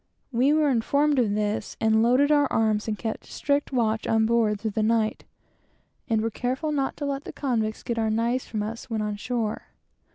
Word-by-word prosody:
We 255 +3 +3
were 305 -2 +3
informed 280 +4 +2
of 210 -4 +1
this, 210 0 -2
and 220 0 +3
loaded 255 +5 +4
our 290 -2 +3
arms 215 -1 +1
and 215 -1 -2
kept 220 0 -5
strict 285 0 -1
watch 225 -4 0
on 225 0 +3
board 220 -2 +2
through 220 +1 -2
the 215 - -1
night, 220 0 +1 0.8
and 220 -1 +2
were 225 +1 -1
careful 260 +7 -2
not 275 -2 -1
to 290 - -3
let 280 0 -2
the - - -6
convicts 225 -6 -2
get 235 -1 -2
our 220 -1 +1
knives 235 +3 0
from 215 -2 -3
us 230 +4 -6
when 220 -2 -1
on 210 -1 -2
shore. 225 0 -3
230 Hz, 200 wpm, -25 LUFS, 220-265 Hz, 0.8 s, loaded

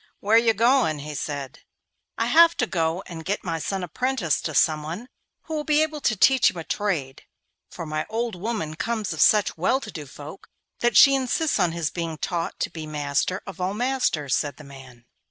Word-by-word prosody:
'Where 210 +2 +2
are - - +9
you 230 -1 +2
going?' 235 - +3
he 150 +1 -7
said. 145 -2 -5 0.6
'I - - +1
have 335 +1 +5
to 245 - +2
go 170 -2 -1
and 165 -3 -8
get 200 +5 -2
my 165 -3 -3
son 190 +3 -3
apprenticed 205 - -1
to - - -3
someone 160 +8 0 0.4
who 320 - -7
will 305 -1 -2
be 300 0 +3
able 310 -1 -4
to 220 - +1
teach 265 +6 +5
him - - -9
a 165 - -5
trade, 160 -10 -3 0.4
for 170 - -7
my 155 0 -3
old 230 +1 -2
woman 180 -5 -4
comes 220 0 -2
of 155 - -3
such 210 -3 +4
well 255 +10 +2
to 225 -6 -9
do 150 -5 -8
folk 145 +7 -11 0.3
that 240 0 +2
she 275 - +8
insists 270 +4 0
on 175 - +2
his 165 -2 -2
being 165 -2 -4
taught 170 +2 -3
to - - -1
be 160 -2 -7
master 150 +4 -1
of 195 -1 -8
all 185 +2 -1
masters,' 240 - 0
said 145 -1 -2
the 155 - -12
man. 130 -4 -14
180 Hz, 210 wpm, -24 LUFS, 155-235 Hz, 0.6 s, are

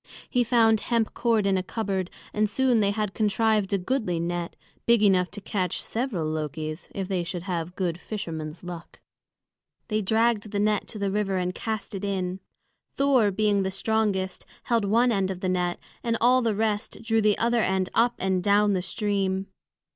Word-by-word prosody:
He 245 -2 +2
found 225 -2 +4
hemp 230 -2 0
cord 230 -3 +1
in 195 -1 +2
a - - -1
cupboard, 190 -2 -2 0.2
and 210 0 +1
soon 250 +1 +2
they 200 -2 +3
had 210 -1 -1
contrived 215 -1 +1
a 200 - +3
goodly 190 -3 -1
net, 170 +1 -3 0.3
big 235 -2 +5
enough 185 -3 +4
to 205 - -8
catch 185 -3 -2
several 225 -9 -2
Lokis, 155 +1 -4
if 195 -2 -3
they 185 -3 -1
should 170 0 -5
have 175 -2 -3
good 175 -3 -2
fisherman's 165 -7 -6
luck. 175 -1 -9 0.9
They 215 0 +1
dragged 220 +1 +2
the 205 - -2
net 210 0 +1
to 220 - -6
the 200 -1 -1
river 195 -2 0
and 180 0 -1
cast 220 +1 -4
it 195 0 -5
in. 190 -2 -2 0.6
Thor, 270 -6 +4
being 205 0 +2
the 190 - 0
strongest, 195 -1 0 0.2
held 230 -3 +1
one 235 +5 +3
end 195 -3 +1
of 185 -1 -5
the 185 - 0
net, 180 -1 0 0.3
and 230 -1 0
all 250 +2 +5
the 225 -3 +1
rest 215 +1 -1
drew 225 -1 +2
the 210 -1 +3
other 235 0 +2
end 190 -2 +1
up 235 +1 +3
and 190 -1 0
down 205 +1 +4
the 185 - 0
stream. 195 0 -1
200 Hz, 185 wpm, -26 LUFS, 185-220 Hz, 0.9 s, big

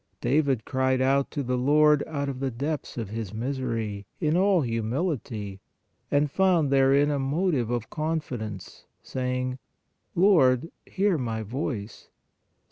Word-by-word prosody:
David 140 -4 +1
cried 130 -1 +1
out 135 +1 +2
to 145 - -3
the 125 0 -1
Lord 150 +2 +4
out 140 -3 -3
of 135 -2 -4
the 135 0 -1
depths 140 +5 -4
of 115 -4 -3
his 110 -2 -5
misery, 115 -5 -3
in 155 -2 +1
all 190 -1 +4
humility, 115 - -3 0.5
and 145 0 +2
found 175 -6 +3
therein 140 +2 +4
a 145 - 0
motive 140 - 0
of 120 -2 -3
confidence, 125 - -4 0.2
saying: 125 0 -2 0.6
"Lord, 165 -6 +4 0.2
hear 190 -4 +1
my 115 -3 -2
voice" 110 -2 -5
(Ps. - - -34
135 Hz, 135 wpm, -26 LUFS, 120-150 Hz, 0.6 s, Lord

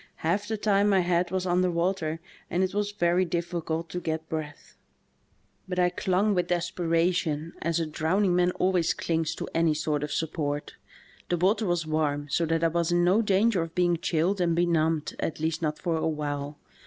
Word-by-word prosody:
Half 200 +5 +1
the 220 0 -2
time 205 -1 +2
my 195 -2 +4
head 175 0 +1
was 185 -1 -2
under 180 0 +2
water 170 -2 -1 0.3
and 180 +2 +1
it 185 - -1
was 205 0 -1
very 180 -2 +2
difficult 170 -1 -2
to 180 - -3
get 160 -2 -3
breath. 150 -2 -6 0.9
''But 180 - -3
I 180 -1 +3
clung 190 +3 +1
with 180 -2 0
desperation, 170 -2 0
as 170 0 0
a 165 - 0
drowning 175 +5 +1
man 180 0 +3
always 180 -3 +1
clings 165 -1 -1
to - - -5
any 165 -2 +2
sort 150 -1 -1
of 150 0 -4
support. 150 -2 -2 0.6
The 175 - +1
water 200 +5 +2
was 175 -2 0
warm, 150 -2 -1
so 170 - +1
that 165 +1 0
I 165 - +4
was 170 +1 0
in 175 0 +3
no 185 +5 +4
danger 205 -1 +2
of 165 0 -5
being 175 -1 +2
chilled 175 +4 0
and 170 -2 +2
benumbed, 165 -3 +1
at 160 - -3
least 160 +1 -1
not 150 -1 -1
for 165 0 -1
awhile. 145 -2 -3
170 Hz, 190 wpm, -27 LUFS, 160-180 Hz, 0.9 s, my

